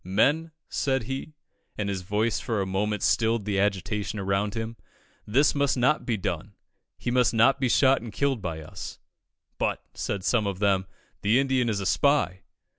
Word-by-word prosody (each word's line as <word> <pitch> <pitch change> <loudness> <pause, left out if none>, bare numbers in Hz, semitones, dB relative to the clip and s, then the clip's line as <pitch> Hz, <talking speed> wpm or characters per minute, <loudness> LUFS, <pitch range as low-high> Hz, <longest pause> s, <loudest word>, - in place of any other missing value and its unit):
"Men," 145 - +2 0.2
said 135 -3 0
he, 135 +5 -5 0.4
and 105 - -1
his 95 -2 -2
voice 105 +5 0
for 110 -3 -2
a 95 - 0
moment 105 +2 -1
stilled 115 -2 +2
the 100 -2 0
agitation 100 +2 -1
around 100 +1 -1
him, 110 0 -4 0.5
"this 135 +8 +3
must 140 -2 +1
not 135 +5 +2
be 115 -3 +1
done 95 +1 -4 0.4
he 120 - -3
must 120 -4 +3
not 115 +5 +5
be 130 -2 +1
shot 135 +2 +4
and 115 -1 -7
killed 135 +2 0
by 80 -3 -4
us." 80 - -8 0.6
"But," - - -1
said 100 -2 -3
some 110 0 +2
of 100 -2 -2
them, 95 -2 +1 0.3
"the 105 +4 +3
Indian 130 -3 +1
is 105 -2 0
a 100 - -4
spy." 140 -7 +2
110 Hz, 180 wpm, -26 LUFS, 100-130 Hz, 0.6 s, not